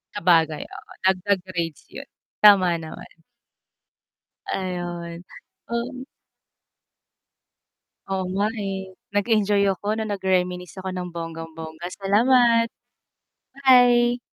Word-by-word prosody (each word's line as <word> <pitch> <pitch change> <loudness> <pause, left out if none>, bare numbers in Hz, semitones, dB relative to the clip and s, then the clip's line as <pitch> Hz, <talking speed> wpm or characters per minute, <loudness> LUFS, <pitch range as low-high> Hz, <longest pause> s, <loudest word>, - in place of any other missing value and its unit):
Sabagay, 165 -5 +2
oo, - - -13
dagdag 190 +1 +2
grades 170 -5 -4
'yun - - -9 0.3
tama 185 -5 +6
naman. 160 +1 -11 1.3
Ayun, 175 -2 -4 0.5
um. 255 +3 -4 2.1
Oo 190 -1 -1
nga 200 +2 +2 0.2
eh, 190 -1 -5 0.2
nag-enjoy 205 -1 +2
ako 205 +2 -10
nung 220 -1 -3
nag 195 - -6
reminisce 180 -1 -1
ako 190 0 -5
ng 180 -1 -4
bonggang-bongga. 165 0 -7
Salamat. 230 +3 +3 1.0
Bye! 245 -1 +5
190 Hz, 90 wpm, -23 LUFS, 175-215 Hz, 2.1 s, tama